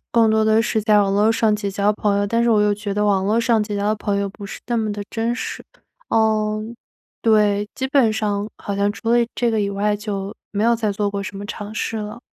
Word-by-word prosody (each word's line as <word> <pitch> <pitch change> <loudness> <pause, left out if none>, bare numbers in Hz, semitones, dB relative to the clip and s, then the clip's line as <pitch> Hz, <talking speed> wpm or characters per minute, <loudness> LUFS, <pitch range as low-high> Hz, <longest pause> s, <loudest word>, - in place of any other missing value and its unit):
更 230 -1 +4
多 220 0 +3
地 220 +1 +4
是 225 -1 0
在 210 -1 +4
网 195 -1 +1
络 210 +2 +4
上 220 -1 +2
结 205 -1 -3
交 200 +2 +1
朋 205 -1 0
友， 205 - +1
但 230 +3 +1
是 235 - +3
我 215 -2 +4
又 210 0 +3
觉 205 -1 -4
得 210 +1 0
网 195 -2 +2
络 220 +3 +2
上 230 -2 +2
结 210 -1 -4
交 200 - -2
的 215 - +2
朋 205 -1 -2
友 200 0 -1
不 200 +1 -11
是 200 - -7
那 240 - -1
么 220 -2 0
的 205 - -5
真 230 +1 -1
实。 - - -5 0.4
嗯， 215 0 +1 0.5
对， 210 -2 +3
基 265 - -2
本 260 -5 +3
上 210 -1 -1
好 200 - -4
像 200 +1 +1
除 225 - -6
了 240 - +5 0.2
这 240 -1 +1
个 220 -2 0
以 200 - 0
外， 205 +1 0
就 200 -1 -5 0.2
没 210 +1 -1
有 235 0 +4
再 220 -2 -1
做 205 +1 -1
过 200 0 -3
什 195 0 -7
么 205 +1 -6
尝 210 0 -6
试 225 +1 -3
了。 210 +2 -6
210 Hz, 275 characters per minute, -21 LUFS, 205-220 Hz, 0.5 s, 了